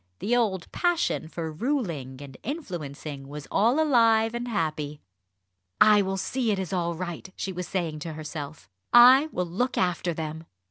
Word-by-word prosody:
The 235 - 0
old 200 -7 0
passion 345 - 0
for 160 0 -5
ruling 165 - -3
and 135 -2 -11
influencing 155 - -6
was 145 0 -8
all 235 +8 +3
alive 230 -6 +4
and 240 +1 -3
happy. 155 -8 -2 0.8
"I 210 -1 +7
will 195 0 -2
see 245 +4 -1
it 205 - +1
is 190 -1 -4
all 170 -2 -1
right," 175 +1 -6
she 190 - -4
was 180 0 -5
saying 165 -5 -2
to 160 +1 -6
herself. 155 -1 -7 0.2
"I 255 +5 +8
will 180 - -1
look 210 +10 -2
after 180 -1 0
them." 160 0 -5
180 Hz, 165 wpm, -26 LUFS, 155-230 Hz, 0.8 s, I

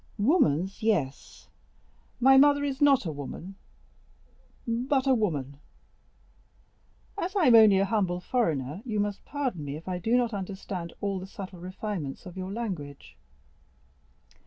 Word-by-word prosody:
"Woman's, 200 - +2
yes; 175 -12 -2 0.7
my 265 +2 +6
mother 285 +1 +5
is 280 0 -3
not 280 -6 +5
woman, 160 +4 -6 1.1
but 255 +4 0
a 265 - +4
woman." 145 - -1 1.6
"As 375 +3 -3
I 380 -5 +3
am 250 - +6
only 215 -3 +7
a 195 - +3
humble 190 -4 0
foreigner, 165 - -1
you 220 -5 -2
must 205 -1 -2
pardon 260 - -3
me 140 0 -5
if 165 - -13
I 180 -1 -2
do 225 +7 +2
not 240 -2 0
understand 190 -3 -5
all 200 -2 -1
the 185 - -8
subtle 190 -2 -9
refinements 185 -5 -5
of 180 - -10
your 190 0 -5
language." 180 -11 -6
200 Hz, 135 wpm, -27 LUFS, 175-245 Hz, 1.6 s, only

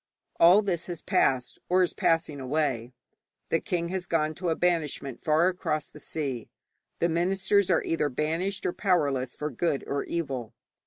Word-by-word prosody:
All 180 +5 +7
this 175 -4 -2
has 175 -3 -6
passed, 125 -2 +1
or 185 +1 +4
is 175 - 0
passing 160 -3 +1
away. 130 -3 -1 0.6
The 165 - +2
king 170 0 -2
has 185 -1 -3
gone 155 -2 +1
to 175 +2 -3
a 160 - +1
banishment 155 -7 -1
far 155 +3 +4
across 155 -5 -1
the 150 - -13
sea, 135 -7 -4 0.5
the 170 - +2
ministers 190 +3 +2
are 170 - +3
either 160 -3 0
banished 165 +8 -2
or 175 - 0
powerless 140 - +1
for 150 0 -3
good 140 +2 -1
or 140 - -2
evil. 130 -9 -4
165 Hz, 165 wpm, -27 LUFS, 140-175 Hz, 0.6 s, All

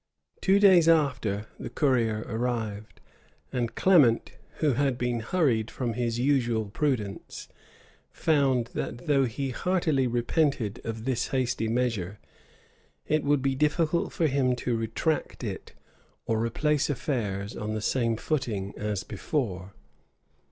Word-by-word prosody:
Two 195 +1 +4
days 190 -5 +6
after, 125 -10 +2
the - - -5
courier 115 -7 +1
arrived; 110 -3 -3 0.5
and 120 -2 -2
Clement, 145 -12 +4 0.2
who 155 -2 +2
had 135 0 +1
been 120 -1 -1
hurried 115 -4 +1
from 120 -3 -3
his 120 0 -1
usual 120 -4 +1
prudence, 105 -2 -3 0.6
found 135 -7 +1
that 120 +7 -4
though 140 -3 +3
he 130 +3 -3
heartily 155 -4 +1
repented 120 - 0
of 115 0 -5
this 130 -2 0
hasty 125 -4 -1
measure, 110 -5 -1 0.9
it 155 0 +1
would 145 -2 +2
be 135 -1 +2
difficult 155 +4 +1
for 165 - 0
him 130 -3 +2
to 120 -1 -1
retract 115 +8 -2
it, - - -6 0.5
or 110 -1 0
replace 150 +6 +1
affairs 110 -7 -2
on 110 -1 -3
the - - -1
same 115 +1 0
footing 115 -10 -2
as 105 -2 -3
before. 100 - -3
125 Hz, 130 wpm, -27 LUFS, 110-145 Hz, 0.9 s, days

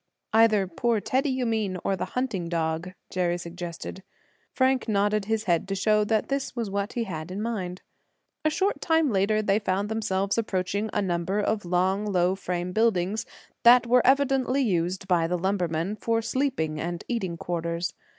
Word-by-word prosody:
"Either 220 -3 +5
poor 225 +5 0
Teddy, 265 +7 0
you 260 -1 -1
mean, 215 -5 -1
or 195 - +1
the 185 - -6
hunting 210 -10 -1
dog," 165 +1 -2 0.2
Jerry 175 -1 0
suggested. 175 +1 -7 0.5
Frank 260 -1 +1
nodded 205 -1 +1
his 220 +1 0
head 175 -2 +1
to 195 - -2
show 210 +2 +3
that 215 0 0
this 275 -2 -2
was 230 -5 -3
what 200 +2 -2
he 240 - -1
had 165 -5 -6
in 190 +2 -5
mind. 195 -5 -3 0.6
A 310 - +3
short 380 +6 0
time 320 -4 +2
later 210 +2 +2
they 205 0 +2
found 200 0 -1
themselves 200 -1 0
approaching 200 0 -1
a 205 - 0
number 175 +1 -1
of 210 -1 0
long, 185 +4 +1
low 180 -2 +2
frame 180 -2 -3
buildings 210 -1 +1 0.3
that 240 0 +7
were 250 +1 +5
evidently 270 0 +3
used 185 -2 -1
by 170 -3 +2
the 180 +1 0
lumbermen 180 0 -1
for 225 +1 0
sleeping 245 - -1
and 170 +1 -4
eating 190 -8 -2
quarters. 170 0 -3
200 Hz, 170 wpm, -26 LUFS, 180-230 Hz, 0.6 s, that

